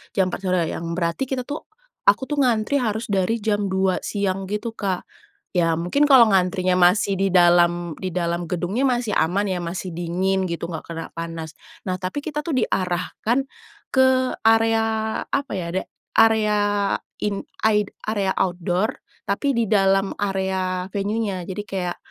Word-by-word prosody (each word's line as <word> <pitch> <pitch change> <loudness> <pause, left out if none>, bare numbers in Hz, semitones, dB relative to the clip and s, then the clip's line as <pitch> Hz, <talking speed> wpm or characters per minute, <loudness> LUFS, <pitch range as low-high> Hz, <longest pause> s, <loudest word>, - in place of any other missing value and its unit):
jam 190 -2 +3
4 - - -5
sore 180 -3 +1
yang 165 0 -4
berarti 170 +6 -1
kita 265 -2 -1
tuh 295 +1 -5 0.4
aku 205 +6 +4
tuh 295 - -2
ngantri 240 +2 +2
harus 220 -1 -2
dari 200 +3 +1
jam 205 -2 0
2 190 -1 +1
siang 195 -2 -1
gitu 225 +2 -3
Kak. 190 -4 -2 0.5
Ya, 165 -1 +3
mungkin 175 - +1
kalau 260 -6 +7
ngantrinya 185 -1 +2
masih 185 +2 +3
di 195 -1 0
dalam 175 -1 +4
di 185 -2 -4
dalam 170 0 -1
gedungnya 180 +9 -1
masih 245 -4 0
aman 185 +6 +1
ya, 185 - -1
masih 180 +2 -4
dingin 185 +3 0
gitu, 170 -1 -4
enggak 160 -2 -6
kena 165 0 -5
panas. 165 -2 -6 0.3
Nah 185 0 -1
tapi 185 +10 -4
kita 300 0 -4
tuh 330 - -2
diarahkan, 190 +3 0 0.5
ke 260 -1 +3
area 225 0 +4 0.4
apa 280 0 -2
ya? 175 -2 -3
da 190 - -1 0.3
area 220 -2 +4 0.7
in 200 -1 -1 0.2
aid 210 -2 +3 0.2
area 205 -3 0
outdoor, 180 +3 0 0.2
tapi 255 +6 0
di 230 - +2
dalam 195 -2 +2
area 190 -2 -1
venue-nya. 200 -1 -1
Jadi 190 +2 -4
kayak, 185 -3 -3
195 Hz, 155 wpm, -22 LUFS, 180-220 Hz, 0.7 s, kalau